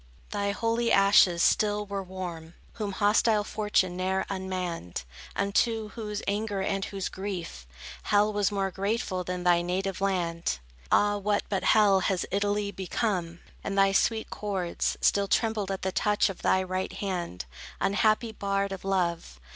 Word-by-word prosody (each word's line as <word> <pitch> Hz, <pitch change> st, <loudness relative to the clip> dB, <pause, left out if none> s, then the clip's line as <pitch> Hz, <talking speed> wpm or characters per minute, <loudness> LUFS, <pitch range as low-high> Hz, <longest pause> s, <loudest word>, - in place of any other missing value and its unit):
Thy 200 Hz, -1 st, -1 dB
holy 230 Hz, +3 st, 0 dB
ashes 195 Hz, -3 st, +5 dB
still 210 Hz, -1 st, +2 dB
were 200 Hz, -1 st, -3 dB
warm, 175 Hz, -3 st, -7 dB, 0.3 s
Whom 205 Hz, -2 st, -2 dB
hostile 210 Hz, +1 st, +3 dB
fortune 205 Hz, -4 st, 0 dB
ne'er 190 Hz, +1 st, 0 dB
unmanned; 185 Hz, -, -4 dB, 0.3 s
Unto 215 Hz, +2 st, +1 dB
whose 210 Hz, -2 st, -5 dB
anger 205 Hz, 0 st, -1 dB
and 195 Hz, 0 st, -1 dB
whose 195 Hz, -2 st, -4 dB
grief, 180 Hz, -, -6 dB, 0.4 s
Hell 210 Hz, 0 st, +3 dB
was 205 Hz, -1 st, +1 dB
more 195 Hz, -1 st, -1 dB
grateful 195 Hz, -1 st, -2 dB
than 180 Hz, 0 st, -4 dB
thy 175 Hz, -1 st, +4 dB
native 185 Hz, +2 st, -2 dB
land. 175 Hz, -, 0 dB, 0.3 s
Ah, 205 Hz, 0 st, +4 dB
what, 205 Hz, +1 st, 0 dB
but 195 Hz, -2 st, -1 dB
hell, 205 Hz, -3 st, +5 dB
has 185 Hz, 0 st, 0 dB
Italy 205 Hz, +1 st, 0 dB
become? 180 Hz, -3 st, -2 dB, 0.2 s
And 200 Hz, -, -3 dB
thy 195 Hz, 0 st, +5 dB
sweet 220 Hz, +3 st, +1 dB
cords 190 Hz, -4 st, -2 dB
Still 200 Hz, 0 st, +3 dB
trembled 220 Hz, -2 st, 0 dB
at 195 Hz, -1 st, -3 dB
the 190 Hz, -, 0 dB
touch 210 Hz, +1 st, +2 dB
of 185 Hz, -, -12 dB
thy 190 Hz, -, +3 dB
right 185 Hz, 0 st, -3 dB
hand, 175 Hz, -, -4 dB, 0.3 s
Unhappy 215 Hz, +3 st, +2 dB
bard 200 Hz, -1 st, -1 dB
of 195 Hz, -, -6 dB
love. 170 Hz, -, -1 dB
195 Hz, 150 wpm, -28 LUFS, 185-205 Hz, 0.4 s, ashes